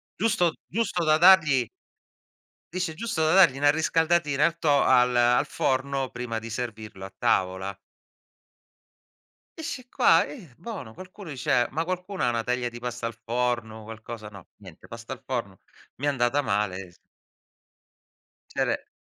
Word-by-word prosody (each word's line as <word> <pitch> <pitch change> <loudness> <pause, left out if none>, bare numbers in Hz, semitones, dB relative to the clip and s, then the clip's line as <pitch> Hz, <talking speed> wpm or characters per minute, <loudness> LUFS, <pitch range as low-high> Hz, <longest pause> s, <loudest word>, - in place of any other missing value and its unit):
Giusto 195 -6 +1 0.2
giusto 200 -5 -1
da 155 0 +4
dargli 165 -7 +6 1.1
dice: 180 -3 -2
"Giusto 175 -3 -2
da 155 - +3
dargli 170 -9 +6
'na 145 0 +5
riscaldatina 160 -2 +2
al 170 +1 +1
to 145 -4 +3
al 125 0 +4
al 120 0 +4
forno 135 0 -1
prima 120 -2 -4
di 115 +1 -8
servirlo 110 -4 -6
a 95 - -9
tavola". 95 +1 0 1.8
Eh, - - -6
sci 255 -6 -6
qua - - +4
eh, 185 - -11
bono, 175 - -7
qualcuno 185 - -11
dice: 125 -2 +1
"Ma 160 +3 -2
qualcuno 185 +2 -4
ha - - +3
1 115 -1 -1
teglia 125 0 -1
di 120 0 -9
pasta 120 -1 -4
al 115 - -5
forno, 120 -2 -2
qualcosa" 110 0 -8
no, 100 -4 -13
niente, 95 -6 -14
pasta 115 +2 -7
al 130 - -19
forno, 115 -8 -4 0.4
mi 140 - -8
è - - +2
andata 135 +1 +1
male, 100 -5 -2
z - - -24 1.6
Cere - - -2
130 Hz, 150 wpm, -26 LUFS, 115-165 Hz, 1.8 s, dargli